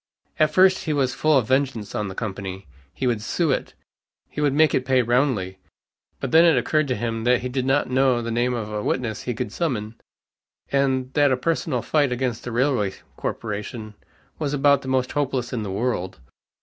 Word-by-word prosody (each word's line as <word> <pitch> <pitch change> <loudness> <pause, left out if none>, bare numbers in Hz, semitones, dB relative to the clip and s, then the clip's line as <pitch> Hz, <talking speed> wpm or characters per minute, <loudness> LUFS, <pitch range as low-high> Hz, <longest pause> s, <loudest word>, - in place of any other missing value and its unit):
At 155 -1 +4
first 185 +3 +4
he 155 - 0
was 135 -3 +1
full 155 -2 +3
of 120 -5 +1
vengeance 130 -5 0
on 105 - -2
the 95 - -7
company. 95 -3 -5 0.3
He 130 - -4
would 120 -4 +1
sue 160 +7 0
it. - - -2 0.6
He 150 - -4
would 145 -2 +3
make 155 +1 +3
it 130 - +1
pay 130 -1 +2
roundly. 120 -7 0 0.6
But 135 - -4
then 165 +1 +7
it 165 -2 +5
occurred 155 -1 +1
to 130 - 0
him 115 -2 -3
that 125 0 +3
he 125 - -3
did 130 0 -2
not 135 +2 +2
know 130 -1 +2
the 115 0 -4
name 120 +2 +1
of 105 -2 -5
a 105 - -2
witness 110 -2 -2
he 125 - -3
could 105 - -4
summon, 115 -10 -2 0.8
and 130 -2 +1
that 145 -2 +4
a 130 - +2
personal 135 -2 -1
fight 145 -4 +1
against 125 -2 -2
a - - -3
railway 120 -5 +1 0.2
corporation 110 0 -5 0.5
was 145 -2 -1
about 140 0 +4
the 130 - -9
most 130 -1 0
hopeless 135 -4 -2
in 120 - -2
the 105 - -4
world. 95 -2 -2
125 Hz, 200 wpm, -23 LUFS, 115-140 Hz, 0.8 s, then